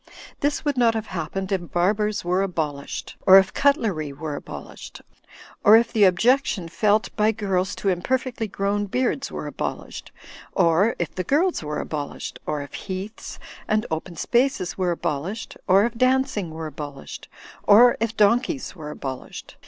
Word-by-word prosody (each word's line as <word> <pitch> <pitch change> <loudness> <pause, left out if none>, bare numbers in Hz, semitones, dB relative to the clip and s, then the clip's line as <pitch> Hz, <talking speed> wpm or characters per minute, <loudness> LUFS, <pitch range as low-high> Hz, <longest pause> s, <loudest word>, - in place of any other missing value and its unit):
This 290 +2 -1
would 290 -3 0
not 230 -2 +4
have 220 -1 -2
happened 190 +2 -4
if 175 -3 -2
barbers 205 +3 0
were 180 +2 +1
abolished, 155 -7 -4
or 190 0 +10
if 190 0 +4
cutlery 210 - +1
were 150 +2 -5
abolished, - - -9 0.6
or 215 +2 +8
if 230 0 +1
the 210 -3 +5
objection 215 - +2
felt 205 +4 +1
by 215 0 +3
girls 195 -3 -1
to 200 - -1
imperfectly 240 +5 -1
grown 200 +1 -1
beards 255 +5 -1
were - - -5
abolished, - - -5 0.4
or 185 +4 +3
if 175 - -3
the 185 - -3
girls 330 - +1
were 150 -1 -4
abolished, 145 -2 -5
or 150 -1 -2
if 140 - -13
heaths 195 +3 -6 0.3
and 215 0 +1
open 160 +2 -4
spaces 240 - 0
were 185 -2 0
abolished, 170 +5 -3
or 195 +2 +5
if 235 - -2
dancing 255 -6 +1
were 160 0 -6
abolished, 145 -2 -8 0.3
or 240 +4 +7
if 225 0 -2
donkeys 240 +5 +2
were 155 -4 -8
abolished. 135 -3 -7
195 Hz, 155 wpm, -23 LUFS, 170-230 Hz, 0.6 s, or